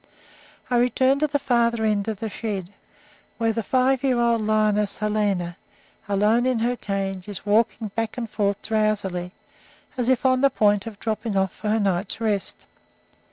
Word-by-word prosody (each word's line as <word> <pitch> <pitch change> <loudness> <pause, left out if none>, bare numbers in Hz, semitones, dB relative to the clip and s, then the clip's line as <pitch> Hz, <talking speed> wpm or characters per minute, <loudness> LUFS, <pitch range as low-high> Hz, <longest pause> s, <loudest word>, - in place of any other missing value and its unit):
I 245 - +3
return 260 +3 +3
to 305 - +2
the 290 0 0
farther 235 -4 +1
end 210 -1 +1
of 215 -3 -4
the 225 - -2
shed, 200 -4 -4 0.6
where 225 -1 +1
the 230 - -1
five 255 +4 +1
year 255 -3 +2
old 235 -1 +2
lioness 210 -1 +1
Helena, 205 -5 -1 0.5
alone 210 +5 +3
in 255 -2 +1
her 240 +2 0
cage, 195 -4 -4
is 205 -1 -7
walking 215 +1 +1
back 225 +3 -3
and 235 -2 -3
forth 205 -2 -1
drowsily, 205 -5 -1 0.7
as 245 0 +1
if 260 0 +2
on 255 0 +3
the 275 - +5
point 205 -3 +2
of 210 -2 -8
dropping 220 -2 -2
off 190 -1 +1
for 210 - -4
her 220 +1 +2
night's 195 0 -1
rest. 210 -4 -2
215 Hz, 170 wpm, -24 LUFS, 205-235 Hz, 0.7 s, the